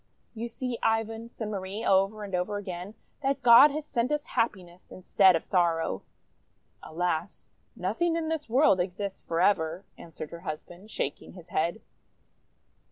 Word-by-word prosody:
"You 230 0 -4
see, 240 0 -4
Ivan," 225 +1 0
said 220 -2 -6
Marie 195 +1 -4
over 195 +2 +2
and 200 -2 -8
over 180 +3 -1
again, 190 0 -6 0.3
"that 275 -1 -1
God 245 +5 +9
has 300 +1 -4
sent 245 -1 -1
us 300 0 -1
happiness 185 -7 -2
instead 185 0 +4
of 165 - -2
sorrow!'' 170 -3 +1 0.8
"Alas, 170 0 -3 0.2
nothing 230 - 0
in 330 -1 -2
this 315 -5 -3
world 255 -5 +4
exists 190 +2 -3
forever!51 170 0 +1 0.2
answered 155 -2 -8
her 170 - -8
husband, 175 +4 -8
shaking 145 - -4
his 180 -2 -13
head. 170 +7 -1
200 Hz, 145 wpm, -28 LUFS, 175-235 Hz, 0.8 s, God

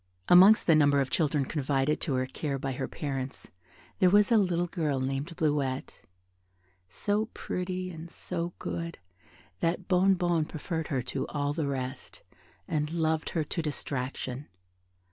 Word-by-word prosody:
Amongst 190 +5 +8
the 165 - +5
number 145 -2 +5
of 135 -1 0
children 150 -4 +1
confided 140 +1 0
to 145 -6 0
her 130 0 +1
care 140 +2 -3
by 135 0 -3
their 130 +1 -3
parents, 135 -2 -5 0.5
there 185 - +6
was 205 +3 +4
a 230 - +6
little 180 -4 +2
girl 155 -6 -1
named 135 +6 -3
Bleuette, 145 -4 -1 0.9
so 205 - 0
pretty 185 0 -3
and 165 0 -9
so 175 0 -4
good 170 0 -4 0.6
that 175 +2 -1
Bonnebonne 180 -3 +3
preferred 160 0 -4
her 130 -4 -1
to 125 - -3
all 145 0 -1
the 155 -2 -1
rest, 130 -1 -5 0.4
and 150 -1 -1
loved 160 -1 0
her 160 - +2
to 165 +3 -3
distraction. 135 -2 -4
155 Hz, 145 wpm, -29 LUFS, 135-175 Hz, 0.9 s, Amongst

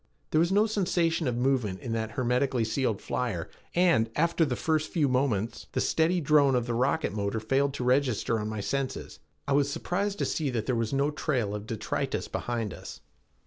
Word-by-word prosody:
There 155 - +3
was 170 +2 +2
no 205 +2 +4
sensation 175 -7 +1
of 120 -1 -1
movement 120 -7 0
in 120 - -6
that 110 -1 -2
hermetically 125 0 +1
sealed 110 -3 -1
flyer, 105 -10 -2 0.2
and, 170 -11 +4
after 170 +1 +2
the 135 -6 0
first 155 +3 0
few 155 -5 +1
moments, 120 -4 0
the - - 0
steady 165 +3 +2
drone 145 -3 +4
of 120 -1 +1
the 120 - -2
rocket 130 +4 +1
motor 100 +1 -1
failed 135 +5 +1
to 130 - -3
register 125 -3 +1
on 105 0 -3
my 110 -1 -3
senses. 135 +5 -3 0.3
I 140 - +1
was 140 0 +2
surprised 200 +7 -2
to - - 0
see 150 -3 -1
that 115 -4 -2
there 130 - 0
was 115 -2 -1
no 140 +2 +1
trail 125 -8 -1
of 105 0 -5
detritus 110 -2 -2
behind 115 -5 -3
us. - - -10
130 Hz, 195 wpm, -28 LUFS, 115-155 Hz, 0.3 s, no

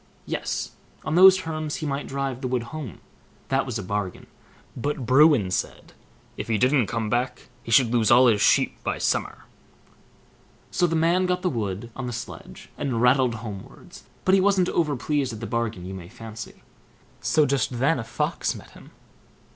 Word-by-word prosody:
Yes! - - -3 0.3
on 155 - -2
those 190 +2 +8
terms 155 -4 -4
he 155 - -5
might 140 -1 -3
drive 135 -2 -3
the 130 - -2
wood 125 -2 -1
home, 145 - -7 0.5
that 135 0 +1
was 125 - -3
a 105 - -5
bargain; 100 0 -4 0.5
but 140 +1 -3
Bruin 130 - +5
said, - - -4 0.4
"if - - -5
he 110 -2 +1
didn't 130 -1 +3
come 115 -2 -2
back, 120 +4 -2
he - - -11
should 115 0 +4
lose 115 -3 +3
all 125 +2 +7
his 110 -4 +3
sheep - - +2
by - - -2
summer". - - -2 1.3
So 175 - +2
the 165 - -1
man 170 +3 +2
got 180 0 -1
the 180 - +1
wood 110 -1 -4
on 130 -2 -5
the 120 - -4
sledge 120 - -9
and 135 -6 -1
rattled 125 0 +3
homewards, 110 - -10 0.2
but 185 - +4
he 195 - +5
wasn't 190 -2 +3
over 155 -4 +1
pleased 135 -1 -1
at 110 - -7
the 115 - -5
bargain 115 -6 -3
you 95 - -6
may 90 -2 -9
fancy. 110 +1 -10 0.6
So 155 -2 +2
just 140 -1 +1
then 135 +5 +2
a - - -3
Fox 115 - -2
met - - -12
him. - - -15
130 Hz, 185 wpm, -24 LUFS, 115-155 Hz, 1.3 s, those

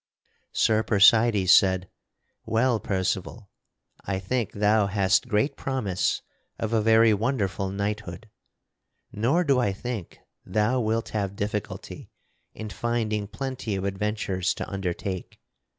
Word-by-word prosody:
Sir 110 -1 +2
Percydes 110 -2 +5
said: 95 -1 +5 0.6
"Well, 115 +1 +1
Percival, 95 +2 -3 0.5
I 95 0 -2
think 110 +3 -2
thou 105 0 +3
hast 100 +3 +2
great 110 +5 +1
promise 110 -9 -1 0.3
of 110 0 -3
a 110 - +3
very 110 0 +5
wonderful 100 -4 -1
knighthood. 100 0 -4 0.8
Nor 130 +12 +1
do 140 -5 +2
I 105 -5 +1
think 110 -2 -6 0.3
thou 105 +6 +1
wilt 115 0 -1
have 100 -2 -2
difficulty 105 0 -5 0.4
in 110 -1 -7
finding 110 -3 -1
plenty 130 -2 -4
of 95 - -3
adventures 100 -2 -1
to - - -5
undertake. 95 0 -4
105 Hz, 120 wpm, -26 LUFS, 95-115 Hz, 0.8 s, Percydes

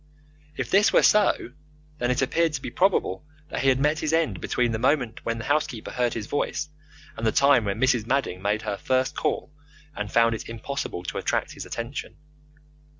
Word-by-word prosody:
If - - -3
this 205 +3 +5
were - - +5
so 210 - +3 0.5
then 120 - 0
it 125 +1 +1
appeared 165 +4 +1
to 140 - -3
be 120 - -5
probable 180 - +1 0.3
that - - -3
he 135 - +3
had 130 0 +3
met 150 +2 +2
his 155 +1 -1
end 150 - +1
between 125 -1 0
the 110 - -2
moment 125 -2 0
when 115 0 -2
the 115 - -5
housekeeper 145 -6 -1
heard 125 -1 0
his 110 -3 -4
voice 145 +3 -2 0.5
and 110 - -6
the - - +3
time 140 -4 +4
when 100 -1 -2
Mrs. 125 -4 +2
Madding 125 -9 0
made 105 +2 0
her 105 -2 -3
first 130 +3 0
call 150 -1 -2 0.4
and 105 -1 -4
found 115 0 +4
it 115 - -6
impossible 115 -5 -4
to - - -4
attract - - -1
his - - -8
attention. 120 +4 -5
125 Hz, 200 wpm, -25 LUFS, 115-145 Hz, 0.5 s, this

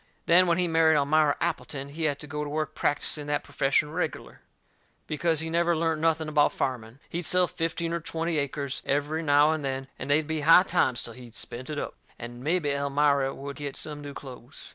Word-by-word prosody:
Then, 180 +2 +5
when 170 -1 +2
he 180 -1 +1
married 160 -1 +4
Elmira 145 +1 +3
Appleton, 140 -1 -3
he 155 +3 -3
had 145 -2 +1
to - - -6
go 150 +1 -4
to 145 - -5
work 155 +1 -2
practising 145 0 0
that 145 0 -1
perfession 140 +2 +1
reg'lar, 160 -1 -4 0.6
because 160 +1 0
he 160 - -4
never 170 0 +2
learnt 160 -1 0
nothing 160 -1 +1
about 150 -1 +3
farming. 120 -2 -3
He'd 170 - -4
sell 180 +2 +4
fifteen 165 0 -2
or 170 - -1
twenty 165 0 -2
acres, 140 -1 -3
every 145 +3 0
now 145 0 +4
and 155 -2 -2
then, 135 0 -3
and - - -6
they'd 150 +2 +3
be 155 0 -2
high 165 +4 +7
times 145 -10 +1
till 115 - -7
he'd 120 -1 -13
spent 125 +4 -5
it 150 - -4
up, - - -4 0.2
and 120 +1 -9
mebby 155 -1 +1
Elmira 140 -1 +1
would 140 -1 -7
get 145 -1 -5
some 150 -1 -5
new 145 -1 -8
clothes. 130 -1 -10
150 Hz, 205 wpm, -27 LUFS, 140-160 Hz, 0.6 s, high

